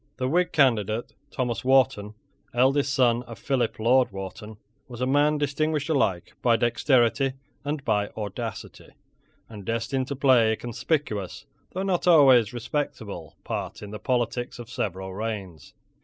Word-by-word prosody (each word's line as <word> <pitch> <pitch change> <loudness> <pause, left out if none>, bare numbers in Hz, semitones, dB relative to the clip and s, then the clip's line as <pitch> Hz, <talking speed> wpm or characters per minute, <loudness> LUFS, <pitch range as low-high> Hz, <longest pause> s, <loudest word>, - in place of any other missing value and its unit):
The 130 0 -1
whig 175 +6 +1
candidate, 115 -5 +1 0.2
Thomas 125 -4 -2
Wharton, 130 -5 +2 0.4
eldest 135 +3 +3
son 120 -2 +3
of 120 -3 -10
Philip 125 +1 -1
Lord 125 +3 +3
Wharton, 100 +2 -8 0.3
was 120 -3 -9
a 125 - 0
man 145 +3 +3
distinguished 150 +1 -1
alike 95 - 0
by 120 -2 +4
dexterity 125 +2 +2 0.3
and 145 -1 -3
by 105 -2 +1
audacity, 105 -3 -6 0.5
and 105 -3 -10
destined 115 +5 -2
to 140 - -3
play 125 -5 +4
a - - -1
conspicuous, 120 - -3 0.3
though 190 - -2
not 185 -2 0
always 135 - +6
a - - -11
respectable, 110 - -4
part - - -5
in 105 - -8
the 105 - -6
politics 120 -1 -1
of 120 0 -10
several 95 -4 -4
reigns. 95 -8 -6
120 Hz, 145 wpm, -25 LUFS, 110-135 Hz, 0.5 s, always